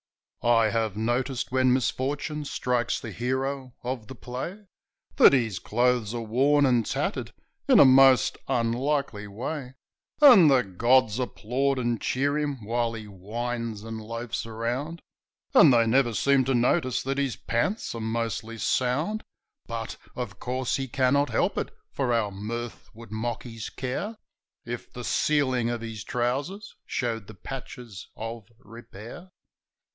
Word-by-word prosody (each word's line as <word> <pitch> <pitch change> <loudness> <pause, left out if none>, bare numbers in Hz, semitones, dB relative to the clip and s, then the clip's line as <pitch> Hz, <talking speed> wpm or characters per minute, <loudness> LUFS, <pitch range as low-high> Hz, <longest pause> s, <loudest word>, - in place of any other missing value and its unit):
I 115 -2 +4
have 110 -2 -1
noticed 120 +4 -1
when 130 0 +3
misfortune 140 +4 -1
strikes 125 -3 -1
the 115 - -7
hero 130 +3 -3
of 125 -3 -4
the 130 - -9
play 150 - -6 0.5
That - - +8
his 115 -8 +1
clothes 120 -1 +1
are 120 - -2
worn 140 +6 +3
and 125 -3 +3
tattered - - -2 0.4
in - - +6
a - - +9
most 130 0 +6
unlikely 120 -2 0
way; 130 +5 -5 0.4
And 240 - +9
the 130 -3 +4
gods 115 +4 +2
applaud 130 +3 -1
and 120 -2 -1
cheer 145 +3 0
him 140 -7 -3
while 115 +1 0
he 110 -1 -7
whines 110 +3 -4
and 115 0 -6
loafs 115 +1 -5
around, 120 +9 -3 0.5
But - - +8
they 120 -3 +5
never 120 0 +2
seem 140 +1 +3
to 135 0 +1
notice 125 +2 +1
that 135 +1 -1
his 135 -3 0
pants 185 - -1
are 115 - -5
mostly 115 0 -3
sound; 145 - 0 0.5
Yet, 115 -1 -5 0.2
of 105 -6 -5
course, 130 0 -1
he 135 -1 -3
cannot 135 +3 +2
help - - +1
it, - - -3 0.2
for 130 -3 -1
our 115 -3 +1
mirth 115 +4 -6
would 115 -2 -12
mock 110 +2 -3
his 115 -3 -7
care 135 - -4 0.5
If 120 +1 -6
the 125 - -8
ceiling 130 -4 +1
of 120 -1 -3
his 110 -3 -6
trousers 140 - -2
showed 115 -5 -2
the 110 - -11
patches 125 -3 -8
of 115 -1 -6
repair. 115 - -11
120 Hz, 145 wpm, -26 LUFS, 115-135 Hz, 0.5 s, a